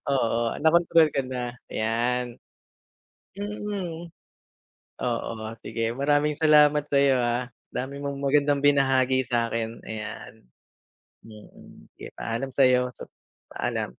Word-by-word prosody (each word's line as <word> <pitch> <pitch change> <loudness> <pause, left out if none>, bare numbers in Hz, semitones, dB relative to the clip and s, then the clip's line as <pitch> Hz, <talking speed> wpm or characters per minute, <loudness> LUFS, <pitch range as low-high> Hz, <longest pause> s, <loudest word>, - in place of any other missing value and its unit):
oo. 120 -4 +1 0.2
Na 160 - +6
kontrol 165 -2 +5
ka 135 - +1
na, 125 -1 -5 0.2
yan. 120 +2 -1 1.0
Mm. 200 -5 -5 0.9
Oo, 120 -1 -2 0.3
sige. 115 0 -2
Maraming 145 +1 +1
salamat 150 -1 +5
sa'yo, 140 -2 +3
ah, 120 +1 -1 0.2
dami 130 +3 -4
mong 140 0 -5
magandang 140 0 +2
binahagi 135 -2 +3
sa'kin, 115 -1 -2
ayan. 105 -10 -8 0.8
Mm, 105 -1 -15 0.2
sige - - -10
paalam 115 +4 -3
sa'yo 125 -2 +4
sa - - -10 0.4
paalam. - - -2
135 Hz, 105 wpm, -25 LUFS, 120-145 Hz, 1.0 s, Na